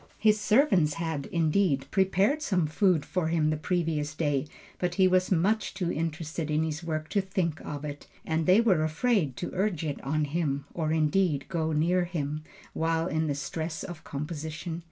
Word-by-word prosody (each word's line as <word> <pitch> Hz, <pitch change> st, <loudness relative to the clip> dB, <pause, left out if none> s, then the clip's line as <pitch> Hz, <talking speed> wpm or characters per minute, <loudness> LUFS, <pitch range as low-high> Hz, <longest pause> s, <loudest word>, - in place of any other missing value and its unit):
His 215 Hz, -1 st, +3 dB
servants 210 Hz, -, +3 dB
had, 160 Hz, -4 st, -3 dB
indeed, 160 Hz, -4 st, +1 dB
prepared 195 Hz, +9 st, +2 dB
some 185 Hz, -, +1 dB
food 160 Hz, 0 st, +2 dB
for 180 Hz, -3 st, -1 dB
him 160 Hz, -2 st, +2 dB
the -, -, +1 dB
previous 155 Hz, -2 st, -1 dB
day, 145 Hz, -2 st, 0 dB, 0.3 s
but 175 Hz, -1 st, -1 dB
he 190 Hz, 0 st, +5 dB
was 185 Hz, 0 st, +3 dB
too 190 Hz, -, +4 dB
much 200 Hz, +3 st, 0 dB
interested 165 Hz, -2 st, -2 dB
in 155 Hz, +1 st, +2 dB
his 160 Hz, +1 st, -3 dB
work 155 Hz, -2 st, -3 dB
to 200 Hz, -, +2 dB
think 185 Hz, -4 st, -2 dB
of 145 Hz, 0 st, -5 dB
it, 145 Hz, -1 st, -7 dB, 0.2 s
and 160 Hz, +1 st, 0 dB
they 190 Hz, +5 st, +6 dB
were 190 Hz, -9 st, +3 dB
afraid 160 Hz, -, +1 dB
to -, -, -4 dB
urge 185 Hz, -4 st, 0 dB
it 145 Hz, -2 st, -3 dB
on 150 Hz, +3 st, 0 dB
him, 145 Hz, -2 st, -1 dB
or 155 Hz, -2 st, -1 dB
indeed, 155 Hz, -1 st, +2 dB
go 160 Hz, -3 st, -1 dB
near 175 Hz, +4 st, +2 dB
him, 155 Hz, -3 st, -3 dB, 0.3 s
while 165 Hz, 0 st, 0 dB
in 160 Hz, -2 st, 0 dB
the 145 Hz, -, 0 dB
stress 160 Hz, +3 st, -4 dB
of 175 Hz, -4 st, -8 dB
composition. 155 Hz, +3 st, -5 dB
160 Hz, 180 wpm, -28 LUFS, 150-185 Hz, 0.3 s, they